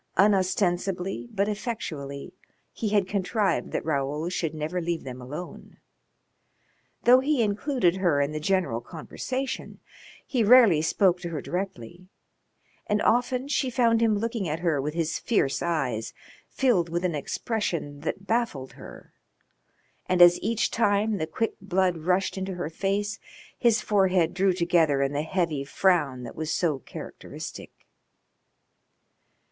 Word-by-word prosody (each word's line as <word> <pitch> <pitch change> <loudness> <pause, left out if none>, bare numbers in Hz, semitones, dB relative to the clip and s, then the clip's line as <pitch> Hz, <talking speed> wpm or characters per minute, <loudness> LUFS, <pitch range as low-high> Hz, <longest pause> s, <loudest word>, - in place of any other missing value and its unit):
Unostensibly 190 0 +1
but 200 -2 0
effectually 180 - -5 0.4
he 220 - -2
had 200 -2 +2
contrived 195 -1 0
that - - -3
Raoul 150 +2 -1
should 165 -3 -2
never 155 +4 -3
leave 170 0 -2
them 130 -1 -8
alone. 150 +8 -8 1.3
Though 250 +1 +7
he 270 -2 +1
included 210 - +1
her 175 -7 +2
in 140 +1 +1
the 155 - -3
general 170 -8 0
conversation 255 - -5 0.5
he 250 -5 0
rarely 220 -8 +7
spoke 180 +2 +2
to 175 - -5
her 160 -3 -4
directly, 180 - -5 0.8
and 210 -1 +1
often 250 +3 +1
she 280 -2 0
found 230 -2 +2
him 220 -2 +3
looking 225 -4 -2
at 155 +2 -3
her 160 -5 +1
with 150 +3 -4
his 165 -2 -1
fierce 200 - 0
eyes 135 -10 -2 0.3
filled 225 -11 +2
with 170 +2 -1
an 175 - 0
expression 155 - -3
that 190 +6 -4
baffled 220 - -1
her, - - -13 0.9
and 185 - +1
as 175 0 +8
each 230 +2 0
time 210 -1 +1
the 155 - -2
quick 225 +6 -2
blood 185 -2 +1
rushed 185 +4 0
into 190 0 -4
her 170 -3 -4
face 200 +4 -1 0.4
his 230 -3 +2
forehead 185 -5 +2
drew 195 +1 +2
together 170 -5 +2
in 135 +1 -1
the 145 - 0
heavy 160 -3 -1
frown 145 -5 +1
that 120 - -8
was 160 0 -3
so 155 -6 0
characteristic. - - -9
180 Hz, 140 wpm, -26 LUFS, 155-210 Hz, 1.3 s, as